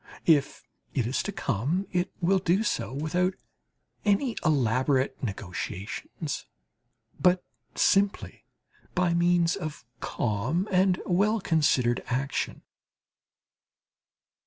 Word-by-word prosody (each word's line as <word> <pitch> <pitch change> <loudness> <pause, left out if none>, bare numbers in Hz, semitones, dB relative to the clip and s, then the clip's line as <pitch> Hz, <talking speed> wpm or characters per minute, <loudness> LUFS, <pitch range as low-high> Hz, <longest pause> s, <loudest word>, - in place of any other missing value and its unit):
If 145 -4 +3 0.3
it 130 -5 +1
is 125 +4 0
to 205 - -3
come 145 - -1
it 180 +1 0
will 190 +3 +3
do 185 +3 +2
so 115 - -1
without 175 +7 0 0.7
any 220 +4 +2
elaborate 130 -2 +2
negotiations, 95 - -5 0.7
but 180 0 +4 0.3
simply 200 0 +2 0.5
by 180 -2 +2
means 175 0 +3
of 155 -9 -6
calm 120 - -1
and 185 -1 +3
well 205 +5 +2
considered 135 -9 +2
action. 135 +3 -2
170 Hz, 95 wpm, -27 LUFS, 130-185 Hz, 0.7 s, but